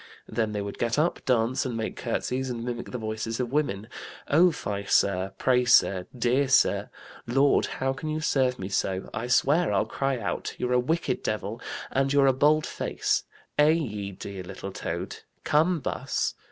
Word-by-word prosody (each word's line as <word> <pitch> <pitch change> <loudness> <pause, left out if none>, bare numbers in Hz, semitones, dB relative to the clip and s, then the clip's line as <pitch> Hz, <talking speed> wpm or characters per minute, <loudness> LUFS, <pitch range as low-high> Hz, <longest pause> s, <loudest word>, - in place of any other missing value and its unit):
Then 110 -2 -1
they 105 -1 -2
would 100 - -7
get 115 +2 0
up, 160 +4 +1
dance 125 0 +2
and 125 -3 -3
make 110 - -3
curtsies, 130 +2 -2
and 120 -2 -4
mimic 120 -1 -4
the 125 - -4
voices 110 +1 -3
of 125 -1 -2
women, 115 -9 -1 0.4
'Oh, 170 +5 +5
fie, 100 -9 -4
sir,' 95 -1 +2
'Pray, 125 -1 +3
sir,' 95 -6 +4
'Dear 125 +4 +2
sir,' 130 - +3 0.4
'Lord, 135 +4 +3
how 135 0 -1
can 155 +3 -5
you 155 0 -1
serve 130 -5 +1
me 95 - -5
so?' 95 -1 -2
'I 115 +2 -3
swear 150 +7 +3
I'll - - +2
cry 135 -1 -1
out,' 110 -4 -3
'You're 125 0 -1
a 125 - +4
wicked 160 +7 -1
devil,' 110 +2 -3 0.3
'And 135 0 +1
you're 140 -1 +5
a 135 - +5
bold 150 +3 +3
face,' - - -1 0.3
'Eh, 150 +1 +7
ye 105 -12 -1
dear 100 0 -7
little 95 +1 -7
toad,' - - -4 0.3
'Come, 160 +3 +3
bus.' - - -1
125 Hz, 180 wpm, -27 LUFS, 110-140 Hz, 0.4 s, Eh